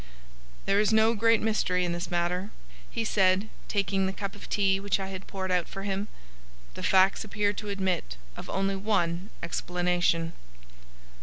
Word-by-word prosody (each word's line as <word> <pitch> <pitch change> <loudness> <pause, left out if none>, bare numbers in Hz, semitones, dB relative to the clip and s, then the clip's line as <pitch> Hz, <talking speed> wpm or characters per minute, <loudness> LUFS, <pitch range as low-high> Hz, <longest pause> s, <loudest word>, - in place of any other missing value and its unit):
"There 200 - +3
is 210 +1 +3
no 220 +1 +5
great 230 0 +3
mystery 185 -4 +1
in 175 - -1
this 175 +2 -3
matter," 180 +2 -1 0.4
he 230 - -2
said, 195 0 +3 0.2
taking 195 -1 +1
the - - -1
cup 195 0 -5
of - - -11
tea 195 -1 +2
which 200 0 0
I 190 0 -4
had 190 0 -7
poured 190 -1 -3
out 180 -2 +1
for 195 - -7
him. 200 +1 -2 0.7
"The - - -8
facts 190 +2 +4
appear 205 -1 0
to 210 +1 -6
admit 190 - -1 0.2
of - - -8
only 195 0 0
one 190 -2 0
explanation." 175 -1 0
195 Hz, 165 wpm, -28 LUFS, 180-205 Hz, 0.7 s, no